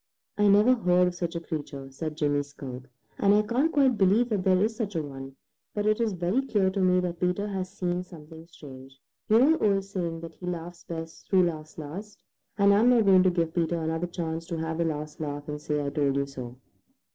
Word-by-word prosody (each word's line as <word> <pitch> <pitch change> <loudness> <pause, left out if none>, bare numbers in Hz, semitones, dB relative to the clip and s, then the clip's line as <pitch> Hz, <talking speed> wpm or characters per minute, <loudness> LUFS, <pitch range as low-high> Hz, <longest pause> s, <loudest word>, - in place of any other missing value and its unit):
"I 205 0 +3
never 210 +5 +6
heard 180 -6 +3
of - - -8
such 175 -1 -4
a - - -1
creature," 145 -4 -6
said 155 +2 -5
Jimmy 145 -2 +1
Skunk, 135 -3 -9 0.3
"and 200 0 +4
I 210 - +4
can't 255 +9 +1
quite 270 -7 +3
believe 205 +6 +4
that 205 -4 0
there 185 -1 +4
is 220 +3 +1
such 210 -5 -4
a 160 - 0
one, 135 -1 -9 0.4
but 205 0 -1
it 215 +2 +2
is 225 -3 +1
very 180 +8 0
clear 205 -8 +1
to 195 - -3
me 180 0 +4
that 175 -1 -4
Peter 180 +3 0
has 190 -2 -3
seen 180 -2 -2
something 165 -2 -12
strange. 135 -5 -13 0.3
You 215 - +6
know 265 +6 +6
the 320 - -4
old 195 -2 +2
saying 170 -4 -4
that 165 -1 -8
he 180 - -9
laughs 175 0 -6
best 165 -1 -7
who 190 -2 +5
laughs 155 -3 -4
last, 185 +8 -8 0.3
and 200 0 +5
I'm 220 +4 +5
not 235 -3 +4
going 190 -2 +6
to 185 - +4
give 170 -2 -1
Peter 170 0 0
another 160 +2 -2
chance 165 -2 -4
to 170 - -3
have 160 0 -3
the 170 - +2
last 150 -1 -4
laugh 145 -1 -5
and 150 0 -5
say, 150 0 -1
'I 140 - -2
told 140 -2 +1
you 140 0 +1
so.'" 125 -3 -8
175 Hz, 230 wpm, -27 LUFS, 155-200 Hz, 0.4 s, never